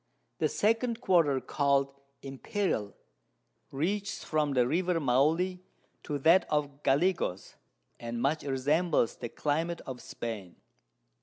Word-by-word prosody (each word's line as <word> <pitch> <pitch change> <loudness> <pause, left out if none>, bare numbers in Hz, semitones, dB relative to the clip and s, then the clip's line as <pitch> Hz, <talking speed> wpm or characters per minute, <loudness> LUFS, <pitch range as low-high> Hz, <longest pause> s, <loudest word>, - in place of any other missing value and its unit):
The - - +3
2_d_ 230 +2 +1
Quarter 165 - +3
call'd 140 +1 +1 0.3
Imperial, 135 - -2 0.7
reaches 200 +8 -2
from 150 -2 0
the 125 -2 +3
River 175 +3 +1
Maule 160 +7 +2 0.4
to 145 - -3
that 165 +6 +4
of 145 -1 -1
Gallegos, 140 - 0 0.5
and 120 0 -5
much 140 +6 +1
resembles 145 +1 +1
the 120 - -5
Climate 165 +6 -1
of 130 -2 -8
Spain. 105 -7 -6
145 Hz, 110 wpm, -30 LUFS, 135-175 Hz, 0.7 s, that